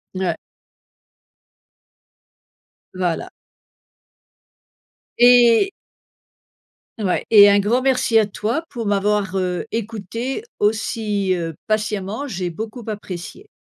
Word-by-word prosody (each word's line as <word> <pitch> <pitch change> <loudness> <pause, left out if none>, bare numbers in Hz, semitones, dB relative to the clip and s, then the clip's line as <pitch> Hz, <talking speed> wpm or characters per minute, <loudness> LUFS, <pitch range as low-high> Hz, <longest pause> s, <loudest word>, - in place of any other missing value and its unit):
Ouais 185 -3 -1 2.6
Voilà. 180 -2 -2 1.9
Et 245 - +6 1.3
Ouais. 190 -4 -1
Et 205 -2 +9
un 200 0 +4
grand 225 +6 +1
merci 255 -4 +3
à 215 - +3
toi 215 +9 -3
pour 235 -5 -5
m'avoir, 200 -1 0
heu, 180 -1 -2
écoutée 230 - -4 0.2
aussi, 210 -2 0
heu, 165 -3 -3
patiemment. 215 +3 -2
J'ai 180 -7 -3
beaucoup 220 +7 -7
apprécié. 205 - -7
210 Hz, 90 wpm, -20 LUFS, 190-230 Hz, 2.6 s, Et